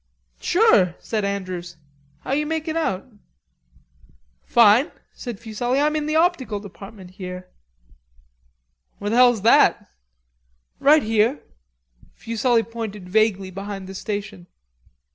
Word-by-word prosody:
"Sure," 210 - +3
said 215 -2 -3
Andrews. 185 -3 -4 0.4
"How - - -6
are - - +2
you 300 +1 -1
makin' 320 0 -3
out?" 195 - -1 1.4
"Fine," 235 +4 +5 0.2
said 240 -6 -7
Fuselli. 240 +3 -2
"I'm 300 +1 +1
in 305 -1 -2
the 310 - -1
optical 315 - +1
department 195 -1 -12
here." 180 -1 -8 1.5
"Where 205 +1 -4
the 235 - +1
hell's 245 -5 +5
that?" 230 - +4 0.9
"Right 300 +2 +5
here." 225 +5 +1 0.7
Fuselli 230 +1 0
pointed 215 -5 -7
vaguely 195 -2 +1
behind 195 0 -7
the 190 - -9
station. 205 -2 -6
215 Hz, 115 wpm, -22 LUFS, 195-255 Hz, 1.5 s, Fine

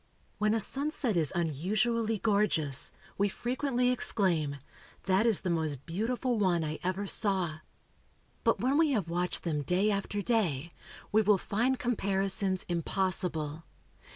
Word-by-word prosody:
When 210 +1 +2
a - - +1
sunset 270 -1 +3
is 160 -4 +1
unusually 210 - 0
gorgeous, 200 - +1 0.3
we 200 0 +3
frequently 250 +2 -1
exclaim, 175 - +1 0.5
"That 190 +5 +2
is 220 -5 +3
the 180 - -1
most 155 -5 -2
beautiful 235 +6 -1
one 180 -4 +2
I 155 0 -4
ever 185 +3 -2
saw!" 190 -6 +1 0.8
But - - +2
when 270 +4 +2
we 310 -3 +3
have 195 -9 -1
watched 175 +1 -2
them 155 -4 -1
day 185 +8 +1
after 200 0 -2
day, 170 - 0 0.4
we 215 +1 +4
will 210 -1 +4
find 240 +8 0
comparisons 195 -4 0
impossible. 170 -3 -2
195 Hz, 135 wpm, -30 LUFS, 170-225 Hz, 0.8 s, we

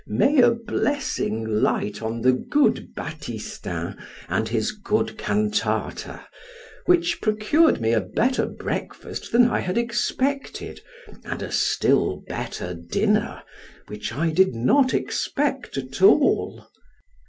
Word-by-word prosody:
May 265 - +3
a 240 - +7
blessing 230 - -1
light 105 -1 0
on 115 +1 -3
the 130 +2 +5
good 285 - +1
Batistin - - -6 0.3
and - - -1
his - - 0
good 210 0 -1
cantata, 210 0 -2 0.6
which 345 -1 +3
procured 215 +10 +3
me 115 0 +1
a 110 - +3
better 245 - 0
breakfast - - -5
than 240 0 +6
I 240 - 0
had 180 +3 -2
expected, 250 +4 -2 0.4
and - - -5
a - - -6
still - - +1
better 90 - -5
dinner 85 0 -1 0.4
which 105 +1 -6
I 160 +7 0
did 185 -4 +3
not 260 - +3
expect 275 - -2
at 135 +4 -5
all! 220 +9 +4
210 Hz, 120 wpm, -23 LUFS, -, 0.6 s, a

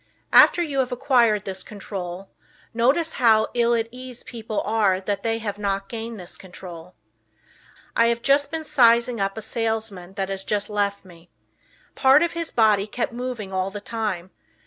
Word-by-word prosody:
After 345 - +7
you 285 -4 -2
have 255 -1 0
acquired 240 -5 +2
this 190 -1 -4
control, 195 -3 -7 0.4
notice 270 +8 +2
how 220 -2 +5
"ill 235 0 +2
at 225 -1 0
ease" 250 0 -9
people 225 -2 -4
are 205 -3 +1
that 200 +1 -3
have 225 -3 -2
not 195 -1 -2
gained 230 -1 -6
this 180 0 -8
control. 180 -2 -11 1.0
I 230 - +4
have 235 0 0
just 280 +1 +3
been 320 +1 -4
sizing 235 -3 +4
up 195 +2 -1
a 220 - -5
salesman 220 -5 -3
that 195 -1 -2
has 195 0 -3
just 205 +1 -2
left 200 -1 -1
me. 175 -1 -17 0.6
Part 270 +4 +5
of 340 - 0
his 335 -1 -4
body 215 -3 +3
kept 235 +2 -3
moving 240 -5 -5
all 185 0 0
the 205 +1 -7
time. 205 -5 -4
220 Hz, 170 wpm, -23 LUFS, 195-240 Hz, 1.0 s, After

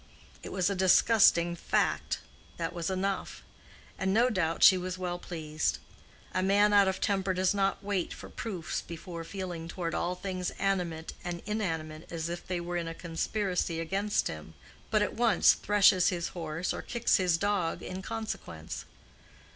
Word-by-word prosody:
It - - -8
was 185 -2 +1
a 200 - +1
disgusting 185 -2 +5
fact; - - 0 0.4
that 165 0 -3
was 170 -1 -2
enough; 190 +1 -2 0.6
and 190 0 +1
no 235 +5 +4
doubt 165 -5 0
she 190 - +10
was 185 0 -3
well 175 -1 -3
pleased. 155 -3 -2 0.6
A 185 - +1
man 205 +2 +4
out 200 -1 +6
of 190 0 0
temper 195 -2 0
does 185 +1 +2
not 195 -1 0
wait 195 -3 -1
for - - -8
proofs 185 -8 -4
before 170 0 -7
feeling 175 -2 -5
toward 170 -1 -4
all 180 +1 -1
things 185 -1 -3
animate 175 -5 -1
and 175 -2 -4
inanimate 165 -7 -3
as 165 -1 -3
if 175 0 -6
they 180 -1 -1
were 175 +1 -3
in 170 -1 -2
a 165 - -5
conspiracy 180 0 -1
against 195 +5 0
him, 80 +1 -8 0.3
but 215 -1 +3
at - - -2
once 230 -4 +5
threshes 195 -3 +4
his 170 -2 -2
horse 165 0 -3
or - - -4
kicks 235 -1 +1
his 180 -3 +2
dog 200 -3 0
in 185 +1 -5
consequence. 220 +2 -5
185 Hz, 165 wpm, -30 LUFS, 170-195 Hz, 0.6 s, she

